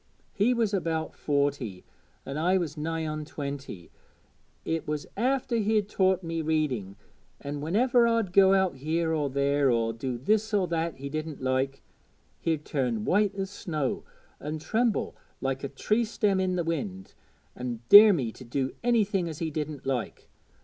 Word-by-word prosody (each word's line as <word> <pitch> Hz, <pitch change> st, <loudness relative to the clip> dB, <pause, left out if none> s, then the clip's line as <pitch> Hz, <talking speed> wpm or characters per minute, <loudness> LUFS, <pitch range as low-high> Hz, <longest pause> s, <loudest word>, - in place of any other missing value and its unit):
He 230 Hz, +5 st, +2 dB
was 225 Hz, -3 st, 0 dB
about 165 Hz, -4 st, -1 dB
forty, 140 Hz, -9 st, -1 dB, 0.4 s
an' 140 Hz, +2 st, -4 dB
I 180 Hz, +4 st, +3 dB
was 165 Hz, -4 st, -2 dB
nigh 160 Hz, +1 st, -3 dB
on 155 Hz, 0 st, -3 dB
twenty; 140 Hz, -, -7 dB, 0.7 s
it 165 Hz, 0 st, -2 dB
was 150 Hz, -1 st, -2 dB
after 255 Hz, +1 st, 0 dB
he'd 215 Hz, -1 st, +1 dB
taught 190 Hz, -2 st, +2 dB
me 165 Hz, -1 st, -2 dB
reading, 145 Hz, -11 st, -1 dB, 0.4 s
an' 145 Hz, 0 st, -5 dB
whenever 235 Hz, -, +3 dB
I'd 230 Hz, -6 st, 0 dB
go 195 Hz, 0 st, +6 dB
out 190 Hz, -7 st, +1 dB
here 160 Hz, +4 st, 0 dB
or 150 Hz, -3 st, 0 dB
there, 140 Hz, +1 st, +2 dB
or 115 Hz, -2 st, +1 dB
do 125 Hz, +2 st, -4 dB
this 215 Hz, -, +1 dB
or 190 Hz, -3 st, +2 dB
that 165 Hz, -1 st, -1 dB
he 140 Hz, +1 st, -7 dB
didn't 155 Hz, -1 st, -5 dB
like, 130 Hz, +1 st, -1 dB, 0.6 s
he'd 160 Hz, -2 st, -1 dB
turn 130 Hz, -5 st, -1 dB
as 105 Hz, -, -4 dB
white 200 Hz, -, +2 dB
as 195 Hz, 0 st, -3 dB
snow, 155 Hz, -9 st, -3 dB, 0.4 s
an' 150 Hz, +2 st, -4 dB
tremble 220 Hz, +8 st, 0 dB, 0.2 s
like 135 Hz, 0 st, -2 dB
a 140 Hz, -, -3 dB
tree 215 Hz, -, 0 dB
stem 210 Hz, -3 st, 0 dB
i' 185 Hz, -, +1 dB
the 180 Hz, -1 st, 0 dB
wind, 105 Hz, -, -4 dB, 0.4 s
an' 125 Hz, -2 st, -5 dB
dare 210 Hz, -, +10 dB
me 130 Hz, -, 0 dB
to 130 Hz, -, -12 dB
do 130 Hz, +2 st, -2 dB
anything 205 Hz, -7 st, +2 dB
as 155 Hz, -, -7 dB
he 165 Hz, -1 st, -3 dB
didn't 150 Hz, -2 st, -4 dB
like. 130 Hz, -3 st, -3 dB
160 Hz, 170 wpm, -28 LUFS, 140-195 Hz, 0.7 s, dare